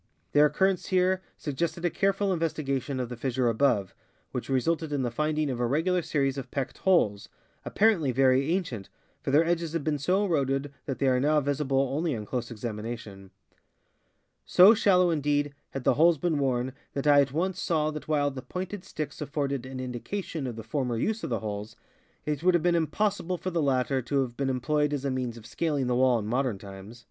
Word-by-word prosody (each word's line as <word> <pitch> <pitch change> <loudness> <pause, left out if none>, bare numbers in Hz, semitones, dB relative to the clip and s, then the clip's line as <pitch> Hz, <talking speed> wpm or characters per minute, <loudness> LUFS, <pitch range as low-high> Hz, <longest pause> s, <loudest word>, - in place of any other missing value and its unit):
Their 150 +1 +6
occurrence 190 +3 +1
here 185 0 +2 0.2
suggested 170 +4 -3
a 175 - +2
careful 195 +1 +1
investigation 140 -5 -2
of 125 - -2
the 125 - -5
fissure 125 +1 -1
above, 115 -5 +1 0.4
which 125 - -5
re 135 -1 +3
sulted 160 +2 -1
in 140 -2 0
the 120 - -1
finding 155 +3 0
of 125 - -4
a 120 - +1
regular 170 +7 +1
series 140 -4 0
of 130 -1 -8
pecked 135 -1 -4
holes, 105 - +2 0.4
appar. 220 +2 +4
ently 140 -5 0
very 135 +3 +3
ancient, 165 - -2 0.3
for - - -4
their 150 +4 +4
edges 170 -1 -1
had 165 -3 -1
been 150 -1 -1
so 185 +8 +1
eroded 140 -4 0
that 135 - -2
they 140 - 0
are 130 -1 +3
now 150 +3 +3
visible 140 -1 0
only 155 -2 0
on 105 -2 -5
close 120 +1 -3
examination. 110 -3 -6 1.1
So 190 +5 +7
shallow, 180 -5 +4
indeed, 145 -2 0 0.2
had 135 - -6
the - - +4
holes 165 +2 +4
been 160 +1 0
worn 130 -2 0 0.2
that 140 - -3
I 145 -1 +7
at 135 -2 -1
once 180 +6 -1
saw 155 -2 +1
that 150 -1 -7
while 145 -2 +1
the 130 -1 -7
pointed 180 +7 -6
sticks 155 -6 -6
afforded 140 -3 -2
an 130 0 -7
indication 135 - -4
of 120 - -5
the 110 - -7
former 125 0 -2
use 220 - -1
of - - -3
the 115 -4 -1
holes, 105 0 -5 0.5
it 150 -1 -2
would 180 +1 +4
have 170 - +1
been 175 0 +3
impossible 180 +2 0
for 185 +2 -4
the 170 -1 0
latter 135 -1 +1
to 135 +3 0
have 120 -2 -7
been 135 +1 -1
employed 150 +3 0
as 140 -1 -3
a 140 - 0
means 125 -2 -3
of 110 - -12
scaling 140 +4 -1
the 125 0 0
wall 125 -1 +4
in 110 - -4
modern 125 -1 0
times. 100 +4 -11
140 Hz, 210 wpm, -27 LUFS, 125-165 Hz, 1.1 s, So